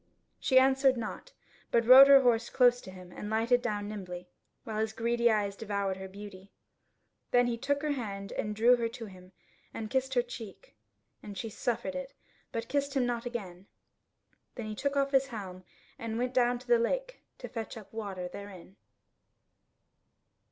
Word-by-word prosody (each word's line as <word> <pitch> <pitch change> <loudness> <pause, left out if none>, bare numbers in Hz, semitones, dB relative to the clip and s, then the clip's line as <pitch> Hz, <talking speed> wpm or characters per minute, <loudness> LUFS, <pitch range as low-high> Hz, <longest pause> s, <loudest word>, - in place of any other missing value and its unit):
She 260 - +3
answered 265 0 +5
nought, 235 - -6 0.4
but 235 -1 +2
rode 260 +3 +10
her 275 -1 +8
horse 235 -2 +2
close 245 -1 +4
to - - -11
him 185 -1 -12
and 210 - -7
lighted 230 +3 +2
down 205 -2 -2
nimbly, 180 -4 -7 0.4
while 215 -2 -4
his 220 0 -1
greedy 235 +1 +2
eyes 205 -3 0
devoured 200 -3 -2
her 190 0 -7
beauty. 200 0 -11 0.8
Then 245 0 +4
he 240 -1 0
took 285 +5 -1
her 300 - 0
hand 200 -7 -4
and 210 0 -3
drew 235 +3 +5
her 230 -1 -1
to 230 0 -8
him, 185 -2 -14 0.4
and 215 -1 -5
kissed 265 0 0
her 245 - +3
cheek, 225 - -10 0.5
and 205 -2 -9
she 225 +2 -5
suffered 240 +6 -2
it, 275 0 -6 0.4
but 230 0 -4
kissed 280 0 -1
him 260 -2 +2
not 240 0 -2
again. 195 -6 -7 0.9
Then 235 - -5
he 215 - -5
took 280 +5 -2
off 275 0 +1
his 270 -1 +3
helm, 190 -7 -7 0.4
and 225 -1 -4
went 250 +1 -1
down 245 -1 +3
to 250 +1 -15
the 240 -1 +5
lake - - -2 0.2
to - - -7
fetch 225 -1 -6
up 215 -1 -12
water 195 -5 -5
therein. 195 0 -11
230 Hz, 180 wpm, -30 LUFS, 205-250 Hz, 0.9 s, rode